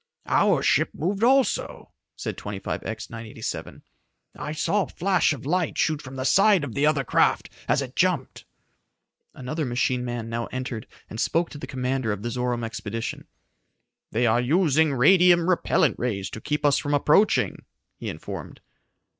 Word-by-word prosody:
"Our - - +3
ship - - +3
moved 195 +6 -2
also," 260 -1 +1 0.2
said - - -5
25X 105 +2 -5
987. 115 -1 -6 0.5
"I 150 - -5
saw 160 +7 +1
a - - -2
flash 185 -2 +1
of 140 -4 -5
light 175 +3 0
shoot 155 -2 +1
from 135 -1 -10
the 130 - -3
side 195 +3 +5
of 145 - -5
the 145 +1 +2
other 150 -3 +2
craft - - +1 0.2
as 140 - +2
it 130 -1 -9
jumped." 175 -7 0 0.9
Another 150 +5 -4
machine 125 -1 0
man 120 -2 -4
now 115 +1 -3
entered 125 -3 -5 0.2
and 110 - -8
spoke 165 +1 0
to 145 - -9
the - - -7
commander 130 -3 -1
of 105 0 -4
the 120 - -3
Zorome 125 -1 -2
expedition. 115 0 -5 0.8
"They 120 +3 +1
are 120 +1 +3
using 155 +2 +3
radium 175 +5 +5
repellent 185 -2 +2
rays 100 -6 -2
to 110 - -7
keep 150 0 -2
us 145 -1 +4
from 145 0 0
approaching," 150 +9 +2 0.3
he - - -6
informed. - - -7
135 Hz, 160 wpm, -25 LUFS, 120-165 Hz, 0.9 s, side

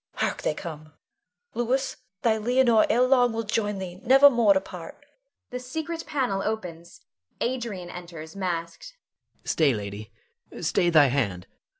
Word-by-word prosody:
Hark! - - -1
they 150 - -1
come. 155 -2 -8 0.6
Louis, 255 +3 -1 0.3
thy 225 -2 +3
Leonore 240 -1 +3
ere 240 +3 +4
long 250 -2 +4
will 225 0 -2
join 210 -1 -1
thee, 180 -2 -6
never 270 +3 +7
more 230 -5 +4
to - - +4
part. 180 - -11 0.5
[The 250 - -4
secret 320 +6 -5
panel 250 -10 -1
opens. 175 -6 -5 0.4
Adrian 230 -8 -3
enters 170 -2 -9
masked.] 175 - -4 0.5
Adrian. - - -37
Stay, 150 -5 +3
lady! 105 +1 -7 0.5
stay 175 - +1
thy 155 -4 +6
hand! 115 -10 -1
200 Hz, 140 wpm, -26 LUFS, 165-245 Hz, 0.6 s, never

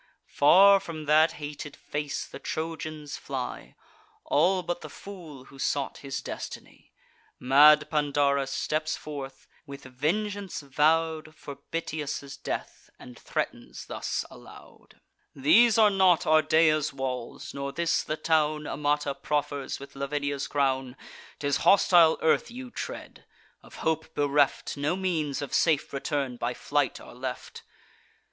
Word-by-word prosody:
Far 195 +7 +6
from 160 -4 -7
that 155 +2 +4
hated 145 -1 -7
face 150 -1 -4
the - - -10
Trojans 155 -2 -5
fly, 130 -2 -6 0.5
All 180 +5 +2
but 175 0 -3
the 155 - -8
fool 160 -7 -11
who 135 - -16
sought 140 0 -1
his 140 -1 -5
destiny. - - -8 0.5
Mad 150 +4 +6
Pandarus 140 -2 +1
steps 155 +2 -2
forth, 135 -3 -8 0.2
with 140 0 -9
vengeance 190 +10 -2
vow'd 155 +2 +1
For 140 -2 -9
Bitias' 150 -4 -4
death, - - -6
and 125 - -12
threatens - - -4
thus - - -3
aloud: - - -16 0.4
"These 205 - +5
are 215 -2 +6
not 190 -3 +4
Ardea's 155 -1 +3
walls, 130 -3 -5
nor 140 0 -4
this 170 +3 0
the 155 - -4
town 155 -1 +1
Amata 145 0 -1
proffers 145 0 -3
with 140 0 -12
Lavinia's 140 0 -2
crown: 135 -2 -1 0.4
'Tis 145 -1 0
hostile 175 -4 +5
earth 160 - +2
you 250 +1 -9
tread. - - -7 0.4
Of - - -15
hope 160 0 -1
bereft, 145 0 +1
No 145 +5 0
means 160 -7 -1
of 140 - -7
safe 155 -4 +2
return 140 -2 -2
by 120 +1 -2
flight 145 -2 -1
are - - -13
left." 125 +1 -6
150 Hz, 130 wpm, -27 LUFS, 140-160 Hz, 0.5 s, Far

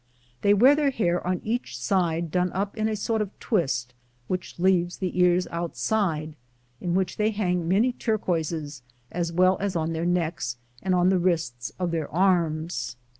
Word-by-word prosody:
They 205 0 +5
wear 255 +7 +7
their 295 -1 +2
hair 175 -9 0
on 180 -1 0
each 235 +3 -2
aide 170 -3 +1
done 180 +1 +1
up 195 +2 -2
in 215 0 0
a 215 - -1
sort 220 +1 -1
of 205 -2 -5
twist 135 - 0
[plate - - -28
lxiii], 120 0 -38
which 185 -1 -4
leaves 175 -1 +2
the 185 -1 -3
ears 180 0 +4
outside, 165 - -1 0.4
in 175 -1 -1
which 190 -1 0
they 215 0 +2
hang 180 -5 -1
many 215 +8 +3
turquoises, 165 - -2 0.3
as 170 -1 -2
well 185 +2 +4
as 195 -2 -2
on 165 0 -1
their 165 +1 -1
necks 165 -8 -1 0.2
and 185 -1 +1
on 180 0 +4
the 190 -1 +3
wrists 160 -9 -1
of 180 -2 -1
their 160 -3 -2
arms. 170 -5 +1
180 Hz, 180 wpm, -26 LUFS, 165-195 Hz, 0.4 s, wear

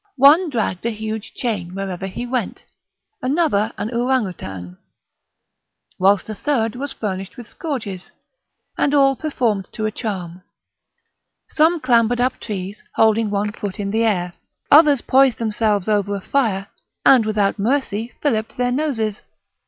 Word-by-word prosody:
One 300 +7 +6
dragged 220 -8 -2
a 235 - 0
huge 220 -1 -5
chain 190 -7 -3
wherever 195 -1 -4
he 215 +6 -5
went, 250 0 -3 0.6
another 255 -7 +1
an 210 +3 -3
ouranoutang, 185 - -2 1.2
whilst 195 +1 +3
a 215 - -4
third 225 -2 -1
was 275 +2 -4
furnished 195 -2 -5
with 245 - -8
scourges, 225 - -5 0.7
and 290 0 +2
all 275 -1 +4
performed 235 - -1
to 215 - -3
a 215 - 0
charm; 185 -6 -5 1.1
some 325 +2 +3
clambered 240 -2 +2
up 255 +1 0
trees, 200 -1 -5
holding 220 0 +3
one 205 0 -1
foot 205 0 -6
in 200 -1 -2
the 225 +2 +1
air; 180 -5 0 0.4
others 290 -3 +7
poised 265 -1 +4
themselves 215 -3 0
over 205 -1 +1
a - - -3
fire, 210 -6 0 0.4
and 255 -4 +7
without 210 -1 0
mercy 230 -1 -1
filliped 225 -7 -1
their 245 0 +1
noses. 245 -7 -1
220 Hz, 140 wpm, -20 LUFS, 200-255 Hz, 1.2 s, others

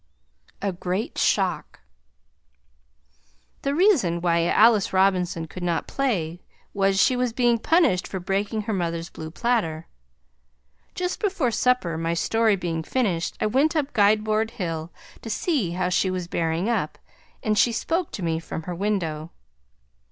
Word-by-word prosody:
A 200 - +1
GREAT 180 +3 -3
SHOCK - - 0 1.8
The 280 +1 -1
reason 295 - +3
why 170 -1 +2
Alice 215 0 +4
Robinson 185 -3 +2
could 180 +3 -9
not 170 -2 -1
play 180 -11 -2 0.3
was, 195 -1 +2
she 255 - +4
was 250 -2 0
being 240 -1 +2
punished 315 - +2
for 190 - -5
breaking 200 +4 -1
her 220 +1 -2
mother's 170 -2 -2
blue 160 0 -7
platter. 170 -6 -1 1.1
Just 360 0 -2
before 370 - 0
supper 220 -10 +1
my 165 +1 -1
story 225 +5 +2
being 170 -3 -3
finished 180 -4 -1
I - - 0
went 275 +9 +2
up 290 -2 -1
Guide 210 -1 +4
Board 215 +1 0
hill 165 -3 -3 0.3
to 225 - -7
see 220 - 0
how 180 0 -1
she 180 +1 +1
was 185 -2 -3
bearing 165 +2 -1
up 215 -10 -1 0.5
and 215 -1 +1
she 235 +3 +4
spoke 330 +9 -1
to 195 - -5
me 165 -1 0
from 165 0 -6
her 180 - -5
window. 170 -5 -2
195 Hz, 150 wpm, -24 LUFS, 170-235 Hz, 1.8 s, Alice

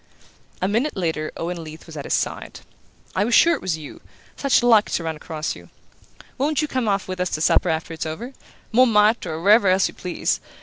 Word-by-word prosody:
A - - +2
minute 230 +6 0
later 160 -4 -2
Owen 170 0 -4
Leath 155 0 -11
was 165 - -11
at 145 - -6
his - - -2
side. - - -4 0.5
"I 190 - +2
was 235 +3 +2
sure 340 - +6
it - - -3
was 180 -4 -2
you! 150 -2 -10 0.3
Such 275 -3 +2
luck 225 -3 +5
to 170 - -1
run 160 -1 -3
across 155 0 -4
you! 85 -1 -14 0.7
Won't 295 +2 +1
you - - -1
come 255 -5 -2
off 195 -2 0
with 185 0 -5
us 180 0 0
to - - -3
supper 155 - +3
after 160 0 -2
it's 160 0 -4
over? 230 +12 -6 0.4
Montmartre, 225 -2 +4
or 160 +1 -5
wherever 205 +1 +5
else 185 +1 +4
you - - -9
please. 180 -1 -2
185 Hz, 215 wpm, -22 LUFS, 160-230 Hz, 0.7 s, sure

